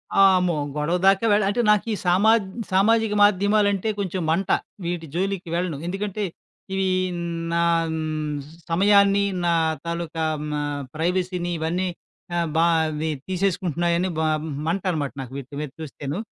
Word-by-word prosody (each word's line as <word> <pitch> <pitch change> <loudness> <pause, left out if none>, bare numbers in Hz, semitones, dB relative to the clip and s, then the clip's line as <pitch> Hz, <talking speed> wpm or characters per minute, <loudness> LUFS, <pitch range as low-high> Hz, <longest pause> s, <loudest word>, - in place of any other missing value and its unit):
ఆ! - - +3 0.2
ఆమ్మో! 180 -3 +1 0.2
గొడవ 150 +4 0
దాకా 195 +3 +4
వెళ్ 210 0 +3
అంటే, 215 +4 +1
నాకీ 210 +1 +1
సామా 190 +5 +4 0.4
సామాజిక 220 +3 +3
మాధ్యమాలంటే 205 0 +3
కొంచెం 185 -2 -2
మంట. 175 +3 0 0.4
వీటి 170 -2 -3
జోలికి 190 -1 -2
వెళ్ళను. 175 -4 -1
ఎందుకంటే, 205 +2 -3 0.5
ఇవి 190 0 +1 0.7
నా 170 - +2 1.1
సమయాన్ని, 200 +3 +4 0.2
నా 170 - +3 0.3
తాలూకా 170 -1 -3 0.3
మ - - -4 0.4
ప్రైవసీని 175 +2 -1
ఇవన్నీ 175 +4 -1 0.5
ఆహ్, 170 -1 +1
బా 165 - +5 0.4
వి 160 - 0 0.2
తీసేసుకుంటున్నాయని 175 -2 0
బ - - +1 0.5
మంట 185 +3 0
అనమాట 145 -6 -2
నాకు 130 -1 -9
వీటి 140 +1 -10
మీద 150 - -5
చూస్తేను. 145 +1 -5
180 Hz, 130 wpm, -23 LUFS, 170-200 Hz, 1.1 s, బా